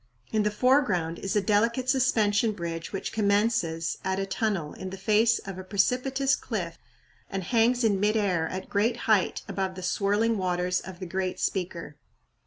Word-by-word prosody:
In 215 Hz, -, +2 dB
the 210 Hz, -, +2 dB
foreground 210 Hz, -, +2 dB
is 195 Hz, +1 st, -3 dB
a 210 Hz, -, +3 dB
delicate 230 Hz, +5 st, +1 dB
suspension 230 Hz, -5 st, +2 dB
bridge 170 Hz, -3 st, -5 dB
which 195 Hz, -, -4 dB
commences 200 Hz, -6 st, +1 dB
at 190 Hz, 0 st, -1 dB
a 195 Hz, -, -1 dB
tunnel 195 Hz, -7 st, -2 dB
in 190 Hz, -, -7 dB
the 190 Hz, -, -7 dB
face 220 Hz, +4 st, +3 dB
of 195 Hz, -1 st, -7 dB
a -, -, -6 dB
precipitous 255 Hz, +8 st, +1 dB
cliff 175 Hz, -8 st, -5 dB, 0.5 s
and 195 Hz, -1 st, -3 dB
hangs 235 Hz, +4 st, +2 dB
in 205 Hz, -4 st, +2 dB
mid 210 Hz, +2 st, +2 dB
air 180 Hz, -6 st, +1 dB
at 185 Hz, +2 st, -5 dB
great 225 Hz, +4 st, +1 dB
height 210 Hz, -4 st, +2 dB
above 190 Hz, -1 st, -3 dB
the 185 Hz, -, -7 dB
swirling 205 Hz, +4 st, +1 dB
waters 180 Hz, 0 st, 0 dB
of 190 Hz, -1 st, -9 dB
the 185 Hz, -, -5 dB
"great 185 Hz, +1 st, -3 dB
speaker." 170 Hz, -5 st, -3 dB
200 Hz, 175 wpm, -27 LUFS, 185-225 Hz, 0.5 s, a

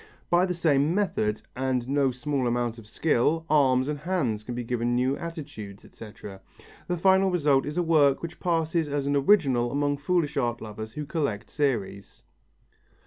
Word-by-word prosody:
By 175 Hz, +2 st, +4 dB
the 180 Hz, -, -2 dB
same 155 Hz, -1 st, +2 dB
method, 110 Hz, -, 0 dB
and 130 Hz, -2 st, -1 dB
no 140 Hz, 0 st, +2 dB
small 130 Hz, +1 st, -2 dB
amount 120 Hz, -1 st, -1 dB
of 110 Hz, -, -14 dB
skill, 160 Hz, +5 st, +1 dB
arms 130 Hz, -3 st, +3 dB
and 150 Hz, -1 st, -3 dB
hands 145 Hz, -, -1 dB
can 120 Hz, +3 st, -6 dB
be 120 Hz, -, -3 dB
given 120 Hz, 0 st, -1 dB
new 130 Hz, +2 st, +1 dB
attitudes, 145 Hz, -, -8 dB
etc. 105 Hz, -3 st, -11 dB, 0.5 s
The 180 Hz, -, -1 dB
final 190 Hz, +2 st, +4 dB
result 145 Hz, -7 st, +2 dB
is 150 Hz, +3 st, -5 dB
a 175 Hz, -, +2 dB
work 150 Hz, -4 st, +3 dB
which 170 Hz, +1 st, -7 dB
passes 165 Hz, -2 st, 0 dB
as 145 Hz, -1 st, -1 dB
an 140 Hz, 0 st, +1 dB
original 135 Hz, -7 st, +3 dB
among 145 Hz, 0 st, 0 dB
foolish 150 Hz, 0 st, 0 dB
art 120 Hz, -3 st, 0 dB
lovers 110 Hz, 0 st, -8 dB
who 150 Hz, +2 st, -5 dB
collect 140 Hz, -9 st, -3 dB
series. 110 Hz, -9 st, -2 dB
140 Hz, 170 wpm, -26 LUFS, 120-160 Hz, 0.5 s, By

